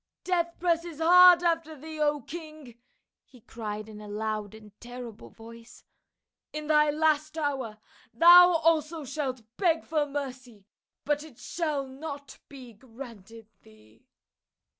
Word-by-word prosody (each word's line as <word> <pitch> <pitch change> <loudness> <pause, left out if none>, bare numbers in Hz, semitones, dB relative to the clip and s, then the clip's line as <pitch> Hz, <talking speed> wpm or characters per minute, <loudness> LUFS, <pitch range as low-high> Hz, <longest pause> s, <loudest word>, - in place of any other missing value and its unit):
" - - -64
Death 340 -2 -1
presses 335 -2 -1
hard 355 +1 +7
after 330 -2 0
thee, 310 +2 -9
O 295 -1 +1
king 305 -5 -10 0.2
!" - - -60
he 250 - -20
cried 215 -1 -7
in 215 -1 -11
a 210 - -10
loud 215 0 -4
and 215 -1 -15
terrible 240 -2 -10
voice. 230 0 -14 0.3
" - - -63
In 305 0 -5
thy 300 0 +3
last 310 +1 0
hour 270 -8 -3 0.3
thou 350 +7 +8
also 320 -1 +1
shalt 260 -3 -4
beg 335 -4 +1
for 305 -2 -1
mercy, 255 -7 -7 0.4
but 295 0 0
it 300 -7 -15
shall 305 -5 -3
not 280 0 -9
be 255 -4 -12
granted 225 -2 -12 0.2
thee." 110 +1 -22
285 Hz, 140 wpm, -27 LUFS, 230-315 Hz, 0.4 s, thou